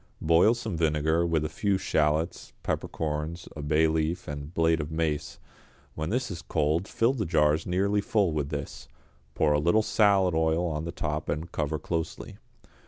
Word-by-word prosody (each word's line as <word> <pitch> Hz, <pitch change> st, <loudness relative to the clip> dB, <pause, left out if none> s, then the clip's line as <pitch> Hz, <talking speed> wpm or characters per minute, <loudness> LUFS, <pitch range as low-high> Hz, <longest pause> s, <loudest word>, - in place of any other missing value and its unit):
Boil 85 Hz, +8 st, +5 dB
some 115 Hz, -6 st, -4 dB
vinegar 80 Hz, +1 st, +1 dB
with 80 Hz, -2 st, +1 dB
a -, -, 0 dB
few 100 Hz, +4 st, 0 dB
shallots, 80 Hz, -2 st, 0 dB
peppercorns, 80 Hz, +2 st, -3 dB
a 75 Hz, -, -5 dB
bay 75 Hz, +2 st, +2 dB
leaf 80 Hz, +2 st, -1 dB
and 70 Hz, +1 st, -6 dB
blade 80 Hz, -1 st, +2 dB
of 75 Hz, -, -5 dB
mace; 75 Hz, -3 st, -2 dB, 0.6 s
when 80 Hz, +1 st, -4 dB
this 125 Hz, 0 st, -1 dB
is 85 Hz, -, -6 dB
cold 80 Hz, +6 st, 0 dB
fill 115 Hz, +3 st, +1 dB
the 120 Hz, -5 st, -2 dB
jars 80 Hz, -2 st, +2 dB
nearly 100 Hz, +3 st, +1 dB
full 100 Hz, -4 st, +1 dB
with 75 Hz, -2 st, -2 dB
this, 75 Hz, -1 st, -6 dB, 0.5 s
pour 75 Hz, -1 st, +3 dB
a 75 Hz, -, +2 dB
little 85 Hz, +8 st, +3 dB
salad 100 Hz, -5 st, +3 dB
oil 80 Hz, +2 st, +1 dB
on 80 Hz, -2 st, -2 dB
the 85 Hz, -, -4 dB
top 75 Hz, -1 st, -3 dB
and 80 Hz, +2 st, -3 dB
cover 75 Hz, 0 st, -1 dB
closely. 80 Hz, +1 st, -4 dB
80 Hz, 170 wpm, -27 LUFS, 75-90 Hz, 0.6 s, Boil